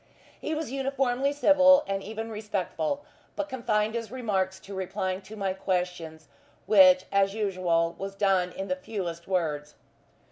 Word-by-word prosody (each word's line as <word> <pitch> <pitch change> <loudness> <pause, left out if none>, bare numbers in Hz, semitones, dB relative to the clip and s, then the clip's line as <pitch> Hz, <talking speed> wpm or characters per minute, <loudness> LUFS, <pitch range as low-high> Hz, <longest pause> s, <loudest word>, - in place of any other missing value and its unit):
He 315 - -3
was 305 -5 -4
uniformly 270 0 0
civil, 285 -1 +6
and 195 0 -2
even 220 +2 -6
respectful, 210 - -3 0.3
but 300 -1 -2
confined 220 -5 0
his 230 -1 -4
remarks 195 -7 -1
to 200 - -10
replying 190 0 -3
to 215 +2 -11
my 195 -3 -1
questions, 180 -4 -3 0.4
which, 185 -3 +6
as 195 0 +2
usual, 180 -5 0
was 195 0 -5
done 190 -3 +2
in 195 +2 -5
the 185 - 0
fewest 180 -4 -5
words. 155 -6 -2
195 Hz, 145 wpm, -27 LUFS, 185-230 Hz, 0.4 s, civil